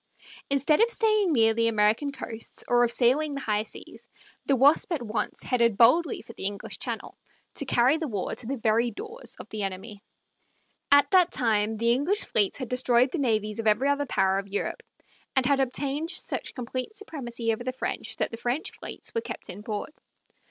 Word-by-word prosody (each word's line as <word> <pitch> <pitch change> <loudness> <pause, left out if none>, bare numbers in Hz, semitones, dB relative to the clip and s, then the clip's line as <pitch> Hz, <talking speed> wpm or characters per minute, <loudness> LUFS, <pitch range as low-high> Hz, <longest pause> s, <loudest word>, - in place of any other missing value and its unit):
Instead 280 - +2
of 465 - +5
staying 430 -5 +2
near 225 -5 +4
the 230 +1 +2
American 220 +6 +2
coasts 230 -4 -7
or 240 0 +4
of 240 - +2
sailing 275 +5 +2
the - - -3
high 210 -3 0
seas, 215 - -10 0.4
the 275 - +4
Wasp 285 +7 +4
at 320 -6 -1
once 220 0 -3
headed 235 -4 +2
boldly 265 +7 +4
for 230 - -12
the 195 - -4
English 200 0 -6
Channel, - - -5 0.4
to 280 - -2
carry 255 +4 +3
the 320 -1 -3
war 205 -7 -3
to 235 - -7
the 275 +2 -2
very 230 +1 +2
doors 445 - -6
of - - -9
the 215 - -5
enemy. 200 +2 -5 0.9
At 285 +2 +6
that 365 -2 +5
time 220 -3 +1
the 230 +2 +2
English 305 - +2
fleets 205 -3 +1
had 255 - -5
destroyed 250 0 +3
the 345 - -2
navies 215 -5 0
of 225 - -1
every 225 +7 +3
other 285 0 0
power 190 -3 +2
of 200 - -7
Europe, 200 +1 -3 0.5
and 265 -1 +3
had 275 +1 +3
obtained 275 +4 -1
such 365 - -4
complete 255 - -5
supremacy 240 - -3
over 220 - -5
the 255 - -2
French 260 - -4
that - - -2
the 230 - -6
French 245 +6 -2
fleets - - -6
were 460 - 0
kept 210 - -6
in 190 +3 -10
port. 210 +6 -5
245 Hz, 195 wpm, -27 LUFS, 220-285 Hz, 0.9 s, At